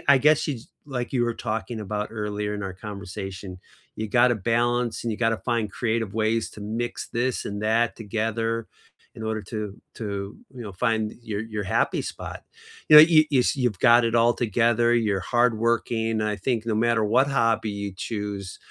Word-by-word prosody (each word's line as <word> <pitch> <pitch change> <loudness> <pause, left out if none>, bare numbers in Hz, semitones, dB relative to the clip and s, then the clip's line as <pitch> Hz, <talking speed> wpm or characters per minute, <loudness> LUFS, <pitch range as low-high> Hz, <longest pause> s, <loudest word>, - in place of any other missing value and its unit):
I - - +5
guess 150 +3 +4
yuou 150 - -1
jus 115 -1 -10 0.2
Like 125 -4 -4
you 125 -3 +1
were 120 - 0
talking 110 0 -4
about 105 +1 -3
earlier 105 -1 -3
in 105 - -4
our 95 - -4
conversation, 95 -2 -7 0.4
you 110 - -3
gotta 120 +4 +4
balance, 120 +3 0
and 115 - -1
you 105 - -4
gotta 115 -2 +1
find 115 -4 -1
creative 115 -3 -1
ways 110 +1 0
to 105 - -11
mix 115 +3 -4
this 125 +2 -1
and 100 0 -4
that 115 +2 +1
together 115 +1 -2 0.5
in 110 - -7
order 110 0 -2
to 105 +2 -6 0.4
to, 100 -2 -5 0.2
you 125 - -7
know, 105 -3 -7
find 110 +2 0
your 105 -2 -3
your 110 -2 -4
happy 95 - 0
spot. - - -7 0.4
You 150 - +8
know, 150 - +13
you 155 -1 +6
you 140 - +3
s - - +1
you've 120 -8 0
got 120 0 +6
it 115 0 0
all 115 +1 +4
together, 120 +1 +2
you're 105 -4 +1
hardworking, 115 -1 +1
I 105 -1 0
think 115 +2 -1
no 110 - 0
matter 115 0 +2
what 125 +6 +3
hobby 115 -5 +1
you 100 0 -4
choose, 100 -1 -5
115 Hz, 190 wpm, -25 LUFS, 105-120 Hz, 0.5 s, know